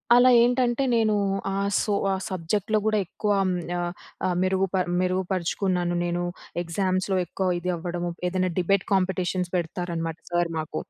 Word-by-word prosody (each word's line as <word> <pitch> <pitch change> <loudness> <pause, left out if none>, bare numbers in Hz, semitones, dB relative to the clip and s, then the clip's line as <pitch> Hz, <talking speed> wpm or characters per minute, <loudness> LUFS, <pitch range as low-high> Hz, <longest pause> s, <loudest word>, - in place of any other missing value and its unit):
అలా 250 +1 +7
ఏంటంటే 245 +1 +2
నేను 220 -2 +3 0.4
ఆహ్, 200 0 0
సో 210 - 0 0.2
ఆహ్, 190 - -2
సబ్జెక్ట్‌లో 195 +4 0
గూడా 215 0 +2
ఎక్కువ 210 +4 -2
అమ్ 185 -1 +1 0.2
యా 175 - -1 0.5
ఆహ్, 180 - 0
మెరుగుప 190 0 +1 0.3
మెరుగుపరుచుకున్నాను 185 -1 0
నేను. 175 0 -1 0.4
ఎగ్జామ్స్‌లో 185 +2 0
ఎక్కువ 185 +2 -2
ఇది 180 +1 -1
అవ్వడము. 175 0 -3 0.2
ఏదైనా 185 0 0
డిబేట్ 190 +2 +2
కాంపిటీషన్ 185 -1 0
పెడతారనమాట. 170 -1 -3
సర్ 175 -1 +1
మాకు. 155 - -4
185 Hz, 140 wpm, -25 LUFS, 175-195 Hz, 0.5 s, అలా